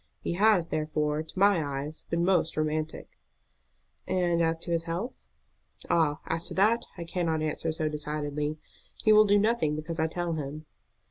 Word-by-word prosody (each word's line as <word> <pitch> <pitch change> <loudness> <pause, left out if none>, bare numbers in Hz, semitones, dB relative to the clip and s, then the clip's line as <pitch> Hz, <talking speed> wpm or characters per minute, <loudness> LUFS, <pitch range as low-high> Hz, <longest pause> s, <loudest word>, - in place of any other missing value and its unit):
He - - -3
has, 195 -2 +3
therefore, 155 -1 -1
to 160 +3 -11
my 195 -4 +4
eyes 145 +2 -5
been 170 +1 +1
most 175 -4 +2
romantic." 155 0 -3 0.9
"And 175 -2 +1
as 165 0 +1
to 170 - -4
his 165 0 0
health?" 175 +9 -3 0.8
"Ah, 155 -2 +2
as 165 +1 -2
to - - -5
that 220 +5 +3
I 170 - -4
cannot 165 -2 -1
answer 155 +1 -1
so 155 0 -1
decidedly. 150 0 -3 0.5
He 215 - +6
will 215 0 +7
do 205 0 +4
nothing 205 -8 +2
because 160 +2 -5
I 160 - +2
tell 175 +1 -2
him." 150 0 -5
165 Hz, 165 wpm, -28 LUFS, 155-175 Hz, 0.9 s, will